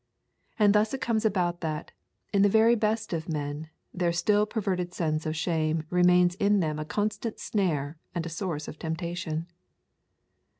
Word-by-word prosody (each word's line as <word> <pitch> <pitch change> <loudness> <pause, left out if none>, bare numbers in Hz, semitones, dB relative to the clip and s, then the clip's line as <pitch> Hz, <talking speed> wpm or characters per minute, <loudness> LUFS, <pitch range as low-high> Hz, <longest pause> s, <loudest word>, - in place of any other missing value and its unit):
And 205 -3 +5
thus 215 +4 +2
it 265 - -7
comes 225 -1 0
about 180 -4 +1
that, 155 -2 -3 0.4
in 200 - +4
the 205 - +6
very 220 +3 +5
best 220 -2 0
of 160 -1 -3
men, 150 0 -3 0.2
their 175 -1 +1
still 205 +5 +2
perverted 185 -5 -2
sense 155 -2 -1
of 155 - -2
shame 160 -1 0
remains 180 0 +5
in 200 +2 +2
them 155 -3 -1
a 155 - -3
constant 215 +5 -2
snare 155 -7 -1 0.2
and 170 -1 -2
a - - -4
source 165 -3 -4
of - - -8
temptation. 165 -1 -3
175 Hz, 165 wpm, -28 LUFS, 160-205 Hz, 0.4 s, the